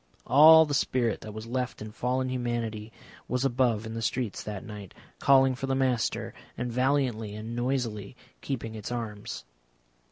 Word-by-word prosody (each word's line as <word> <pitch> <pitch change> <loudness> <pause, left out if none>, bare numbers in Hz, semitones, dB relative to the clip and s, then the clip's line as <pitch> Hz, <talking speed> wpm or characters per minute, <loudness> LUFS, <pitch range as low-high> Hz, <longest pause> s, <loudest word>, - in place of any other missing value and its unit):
All 160 +3 +8
the 150 - -3
spirit 125 -5 0
that 110 - -8
was 110 +1 -6
left 125 +1 -3
in 110 0 -7
fallen 130 +3 -1
humanity 120 -3 -3 0.4
was 125 +1 -1
above 120 -4 +1
in 110 - -6
the 115 - -4
streets 120 -2 -2
that 105 -3 -6
night, 105 -3 -9 0.2
calling 135 -1 +5
for 135 +1 -4
the 135 - +1
Master, 130 -3 0 0.2
and 120 -1 -3
valiantly 125 -5 0
and 110 +2 -6
noisily 120 -4 -2 0.3
keeping 115 -5 -4
its 110 +1 -6
arms. 110 - -5
120 Hz, 160 wpm, -28 LUFS, 110-130 Hz, 0.4 s, All